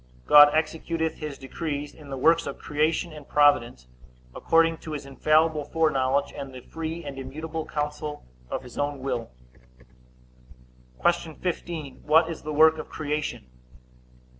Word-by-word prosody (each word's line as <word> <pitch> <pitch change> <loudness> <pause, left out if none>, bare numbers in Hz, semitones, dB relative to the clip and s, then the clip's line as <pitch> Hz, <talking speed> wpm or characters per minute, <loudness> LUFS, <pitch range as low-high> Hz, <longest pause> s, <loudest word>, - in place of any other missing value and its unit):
God 145 0 +9
executeth 160 +1 -1
his 150 -3 -5
decrees 145 +1 -5
in 150 -2 -14
the 135 - -4
works 165 +4 +3
of 140 - -5
creation 155 +3 -1
and 150 -2 -11
providence, 120 - +3 0.5
according 165 0 +2
to 155 - -7
his 145 -2 -5
infallible 155 +3 +2
foreknowledge, 140 -3 +1
and 140 -2 -7
the 125 - -8
free 165 +4 -6
and 140 -2 -7
immutable 155 +4 -5
counsel 150 0 -4 0.2
of - - -4
his 125 - -10
own 145 -1 -2
will. 125 -4 -3 1.8
Q. 170 -2 0
15. 165 -5 -5
What 160 +2 +4
is 165 - -7
the 155 - -5
work 160 +1 +5
of - - -7
creation? 150 - -3
150 Hz, 140 wpm, -26 LUFS, 140-160 Hz, 1.8 s, God